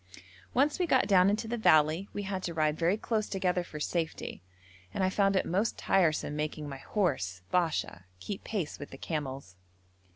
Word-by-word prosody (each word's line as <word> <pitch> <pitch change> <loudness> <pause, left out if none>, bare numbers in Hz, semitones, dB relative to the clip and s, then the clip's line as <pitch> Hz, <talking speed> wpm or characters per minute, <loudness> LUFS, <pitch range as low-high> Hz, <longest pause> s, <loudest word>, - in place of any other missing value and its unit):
Once 285 +6 +3
we 360 - +1
got 260 -9 +4
down 190 -1 +6
into 215 +2 -1
the 235 +1 -2
valley 155 0 +4
we 205 - -4
had 190 -1 -3
to 170 -2 -4
ride 155 -1 +2
very 170 +5 +2
close 220 -1 -1
together 180 -2 0
for 155 -3 -8
safety, 160 +1 -3 0.5
and 190 - 0
I 185 - +2
found 195 0 +2
it 190 - +2
most 200 +6 0
tiresome 160 -5 +2
making 150 0 -3
my 135 -1 -7
horse, 95 - -1
Basha, 160 - 0
keep 195 - -6
pace 190 -9 -3
with 145 - -7
the 135 - -10
camels. 135 - -5
180 Hz, 185 wpm, -30 LUFS, 150-200 Hz, 0.5 s, down